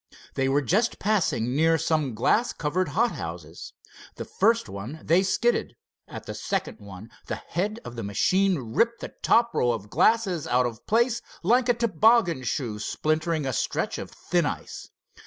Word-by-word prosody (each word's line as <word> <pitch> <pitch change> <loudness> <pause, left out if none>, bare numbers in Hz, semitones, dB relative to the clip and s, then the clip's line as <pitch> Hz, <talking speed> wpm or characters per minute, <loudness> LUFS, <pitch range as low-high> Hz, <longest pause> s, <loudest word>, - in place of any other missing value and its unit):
They 135 0 0
were 145 +2 +2
just 215 - +1
passing 165 - 0
near 165 +2 +3
some 155 -6 0
glass 230 - +2
covered 165 +4 -1
hothouses. 85 - -3 0.4
The - - -6
first 230 +3 +1
one 110 +11 -7
they 170 +4 +4
skidded. 230 +5 0 0.3
At - - -9
the - - -6
second 195 -9 -3
one 100 +1 -11 0.2
the - - -2
head 210 +6 -3
of 120 - -8
the 115 - -5
machine 185 - +2 0.2
ripped 235 - +1
the - - -7
top 235 0 +3
row 120 - +2
of 105 -3 -5
glasses 200 -8 +2
out 125 +1 +2
of 115 -3 -6
place 235 +2 +2 0.2
like 245 +6 +3
a 245 - +4
toboggan 220 - +3
shoe 115 -3 -2
splintering 155 +5 -1
a 130 - -2
stretch - - -2
of - - -7
thin - - -1
ice. - - -6
165 Hz, 165 wpm, -26 LUFS, -, 0.4 s, they